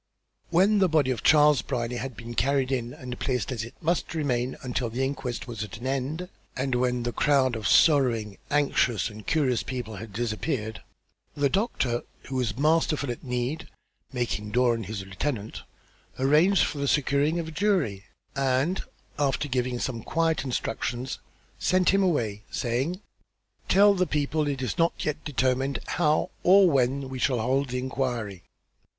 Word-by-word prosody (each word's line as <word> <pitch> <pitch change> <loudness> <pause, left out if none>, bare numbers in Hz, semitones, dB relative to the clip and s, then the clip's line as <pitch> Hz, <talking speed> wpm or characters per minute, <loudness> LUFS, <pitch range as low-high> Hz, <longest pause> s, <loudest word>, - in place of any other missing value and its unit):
When 195 +5 +4
the 190 -2 +4
body 150 -5 +3
of 120 -6 -3
Charles 150 -4 +5
Brierly 120 -2 -3
had 125 -1 -5
been 115 +1 -7
carried 135 +1 +1
in 120 -2 -1
and 125 -1 -8
placed 130 0 -1
as 115 -4 -3
it 115 +3 -10
must 165 0 -1
remain 130 -5 -1
until 125 -1 -2
the 125 +4 -2
inquest 135 -3 -3
was 115 -3 -4
at 105 - -8
an 120 - -9
end, 135 +6 -2 0.3
and 130 0 -1
when 125 0 +1
the 120 - -1
crowd 135 -4 +3
of 110 - -2
sorrowing, 120 - +3
anxious 130 -7 +1
and 105 0 -12
curious 135 -7 +2
people 120 -5 -5
had 110 +1 -8
dispersed, 110 +1 -2 0.6
the 145 -1 +2
doctor, 130 - 0 0.2
who 135 - -6
was 120 -4 -1
masterful 155 -2 +2
at 120 - -7
need, 125 +4 -3 0.4
making 120 -5 -2
Doran 120 -1 +2
his 100 -2 -5
lieutenant, 105 +3 -4 0.6
arranged 155 +8 +4
for 145 - -2
the 140 - -1
securing 145 +3 +2
of 165 -2 -3
a - - -8
jury; 155 - 0 0.3
and, 135 +6 +1 0.4
after 145 0 +1
giving 125 -2 -1
some 120 -2 -3
quiet 165 +5 0
instructions, 125 0 -3 0.4
sent 185 -1 +3
him 195 +1 +3
away, 115 - 0
saying: 135 - -2 0.7
"Tell 200 +1 +6
the 185 -2 +1
people 150 +1 0
it 135 -2 -2
is 125 - -3
not 165 +1 +3
yet 150 0 -2
determined 130 -1 0
how 155 +4 +1
or 190 +1 +6
when 135 -2 +1
we 130 -1 -6
shall 125 -2 +1
hold 135 +5 +1
the 125 - -2
inquiry. 125 -7 -3
130 Hz, 165 wpm, -26 LUFS, 120-150 Hz, 0.7 s, Tell